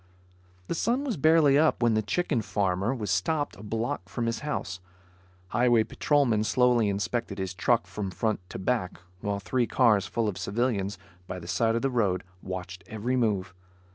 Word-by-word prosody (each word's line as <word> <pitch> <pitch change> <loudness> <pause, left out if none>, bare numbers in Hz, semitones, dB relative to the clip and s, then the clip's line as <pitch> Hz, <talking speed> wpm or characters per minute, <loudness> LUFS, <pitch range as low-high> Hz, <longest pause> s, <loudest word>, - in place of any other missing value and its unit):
The - - -2
sun 240 - 0
was 260 -6 -1
barely 155 -2 +5
up 155 -5 +3
when 120 -1 +4
the 110 - +2
chicken 130 - 0
farmer 100 +1 0
was 110 -7 -3
stopped 145 - 0
a 95 - -12
block 110 -3 -3
from 120 - -2
his 115 0 -1
house, 120 -11 -3 0.7
Highway 120 0 +4
patrolmen 125 -5 +2
slowly 120 0 +3
inspected 100 +1 -2
his 95 -1 -3
truck 115 +5 +2
from 100 -2 -4
front 110 +3 -1
to - - -6
back, 95 -4 -1 0.2
while 100 +1 -2
three 120 +4 0
cars 110 -7 +3
full 115 -2 -1
of 100 - -3
civilians, 105 -3 -1 0.3
by 90 - -5
the 85 -1 -9
side 115 +4 +1
of 115 - -1
the 135 - +1
road, 100 -7 +1 0.2
watched 90 0 -6
every 110 +4 -2
move. 100 -6 0
110 Hz, 175 wpm, -27 LUFS, 100-125 Hz, 0.7 s, barely